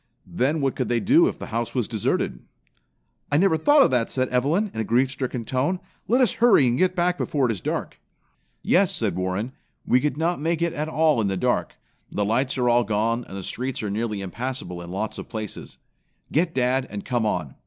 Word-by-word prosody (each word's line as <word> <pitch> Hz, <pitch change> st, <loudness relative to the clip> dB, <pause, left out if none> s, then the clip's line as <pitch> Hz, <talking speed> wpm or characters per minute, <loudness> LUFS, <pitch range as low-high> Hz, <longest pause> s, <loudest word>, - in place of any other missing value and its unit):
Then 145 Hz, +5 st, 0 dB
what 135 Hz, -1 st, 0 dB
could 130 Hz, -, -1 dB
they 120 Hz, -1 st, +1 dB
do 305 Hz, -, +5 dB
if -, -, -3 dB
the -, -, -7 dB
house 115 Hz, +2 st, -2 dB
was 125 Hz, -4 st, 0 dB
deserted?" 105 Hz, -, -1 dB, 0.9 s
"I 145 Hz, -, +3 dB
never 190 Hz, 0 st, +4 dB
thought 290 Hz, -, +5 dB
of -, -, +2 dB
that," 120 Hz, -3 st, +1 dB
said 130 Hz, -1 st, -1 dB
Evelyn 155 Hz, -, +1 dB
in -, -, -5 dB
a -, -, +1 dB
grief 125 Hz, +5 st, +2 dB
stricken 130 Hz, -4 st, -4 dB
tone. 140 Hz, +10 st, 0 dB, 0.3 s
"Let 245 Hz, +5 st, +3 dB
us 240 Hz, -7 st, +4 dB
hurry 235 Hz, -, +6 dB
and 120 Hz, -1 st, +2 dB
get 185 Hz, +5 st, +2 dB
back 180 Hz, 0 st, +1 dB
before 140 Hz, -3 st, 0 dB
it -, -, 0 dB
is 100 Hz, -5 st, -5 dB
dark." -, -, -3 dB, 0.6 s
"Yes," -, -, +3 dB
said -, -, -1 dB
Warren, 95 Hz, +6 st, -2 dB, 0.3 s
"we 125 Hz, -, +3 dB
could 145 Hz, -2 st, -1 dB
not 165 Hz, 0 st, 0 dB
make 165 Hz, +1 st, 0 dB
it 170 Hz, -1 st, 0 dB
at 150 Hz, -1 st, -3 dB
all 155 Hz, -5 st, +2 dB
in 105 Hz, -, 0 dB
the 95 Hz, -1 st, -1 dB
dark. -, -, 0 dB, 0.4 s
The 105 Hz, -, -1 dB
lights 125 Hz, +6 st, 0 dB
are 125 Hz, -1 st, +1 dB
all 120 Hz, 0 st, +4 dB
gone, 115 Hz, +3 st, 0 dB
and 95 Hz, -, -8 dB
the 95 Hz, -, -6 dB
streets 125 Hz, +5 st, -4 dB
are 105 Hz, -, -2 dB
nearly 105 Hz, -1 st, -2 dB
impassable 100 Hz, -3 st, -5 dB
in 85 Hz, -, -9 dB
lots 100 Hz, +4 st, -3 dB
of -, -, -9 dB
places. 110 Hz, -3 st, -6 dB, 0.5 s
Get 165 Hz, +3 st, +1 dB
dad, 130 Hz, +1 st, +1 dB
and 105 Hz, -1 st, -6 dB
come 120 Hz, -4 st, 0 dB
on. 85 Hz, -9 st, -2 dB
125 Hz, 220 wpm, -24 LUFS, 110-155 Hz, 0.9 s, hurry